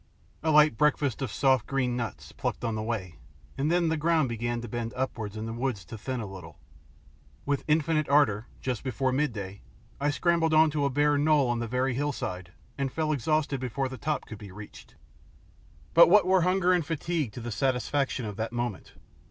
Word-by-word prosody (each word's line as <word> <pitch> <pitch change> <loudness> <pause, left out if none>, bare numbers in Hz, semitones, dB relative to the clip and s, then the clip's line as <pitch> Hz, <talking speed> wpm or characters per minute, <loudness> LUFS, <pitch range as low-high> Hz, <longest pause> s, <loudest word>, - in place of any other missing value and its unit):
A 160 - 0
light 150 -5 +5
breakfast 145 -4 +2
of 130 -5 -2
soft 130 -2 +2
green 130 -3 0
nuts, 120 -2 -5
plucked - - -4
on 115 - -1
the 110 - -2
way, 100 -8 -4 0.4
and 145 +4 0
then 175 -1 +2
the 160 - 0
ground 160 -3 +2
began 120 +1 -2
to 120 - -6
bend 115 +1 -4
upwards 110 -5 -3
and 110 +1 -4
the 115 - -4
woods 120 -6 -3
to 85 - -8
thin 125 +4 -4
a 110 - -4
little. 95 -2 -10 0.9
With 140 0 0
infinite 155 0 +1
ardour, 125 -7 +3
just 125 -3 -3
before 130 0 -1
midday, 110 -9 -2 0.4
I 145 +1 +1
scrambled 165 +1 +2
on 155 0 +6
to 145 -1 0
a - - +2
bare 145 +2 +2
knoll 145 -3 +3
on 120 - -1
the 120 - -3
very 125 +2 0
hillside, 120 -10 -3 0.3
and 135 -1 -1
fell 155 +1 -1
exhausted 150 0 0
before 130 +2 -2
the 130 - -7
top 155 0 -2
could 110 - -9
be 100 -3 -10
reached. 105 +2 -12 1.0
But 170 +1 +8
what 205 0 +6
were 190 0 +4
hunger 185 +1 +3
or 180 - +3
fatigue 160 -3 -2
to - - -7
the 120 0 -5
satisfaction 130 +1 0
of 105 -2 -6
that 110 +1 -3
moment? 120 -4 -4
135 Hz, 200 wpm, -28 LUFS, 115-150 Hz, 1.0 s, But